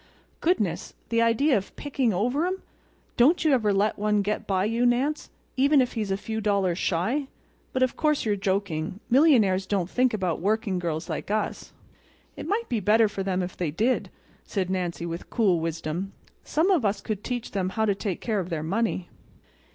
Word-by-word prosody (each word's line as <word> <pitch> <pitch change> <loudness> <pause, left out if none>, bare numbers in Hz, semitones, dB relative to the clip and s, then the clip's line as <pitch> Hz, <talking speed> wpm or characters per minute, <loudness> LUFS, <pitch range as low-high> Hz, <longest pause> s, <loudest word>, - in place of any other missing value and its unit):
"Goodness! 210 - 0
the 230 0 +2
idea 245 +5 +3
of 195 -1 -3
picking 270 -5 0
over 245 - +1
'em! 375 +1 -3 0.5
Don't 300 +9 +4
you 305 - +5
ever 220 -5 +3
let 200 +2 +1
one 210 -1 +2
get 210 +2 -2
by 190 -1 +1
you 230 +3 0
Nance—even 275 +2 +1
if 250 -2 +1
he's 215 -3 -2
a 195 - 0
few 220 +2 -4
dollars 195 -4 +1
shy. 225 - 0 0.4
But 260 - +1
of 255 - 0
course 300 -4 +1
you're 210 -2 +2
joking—millionaires 195 - +2
don't 190 -3 -1
think 255 0 +3
about 185 -5 -1
working 205 -1 0
girls 160 -3 -3
like - - -4
us." 215 0 -2 0.6
"It - - -7
might 445 +4 -1
be 235 - 0
better 215 +3 +4
for 200 -1 -5
them 190 -1 0
if 180 - -6
they 175 -4 -2
did," 225 - 0 0.3
said 185 -3 -2
Nancy, 175 -2 -2
with 170 0 -6
cool 195 -8 +2
wisdom. 165 +3 -3 0.3
"Some 330 +6 +1
of 340 -9 +3
us 200 -1 +1
could 210 0 -4
teach 245 -2 -4
them 190 -2 -1
how 220 +3 0
to 205 - +2
take 195 -2 -4
care 220 -3 0
of 180 -1 -4
their 160 -3 -2
money." 190 +1 -1
210 Hz, 185 wpm, -26 LUFS, 185-245 Hz, 0.6 s, you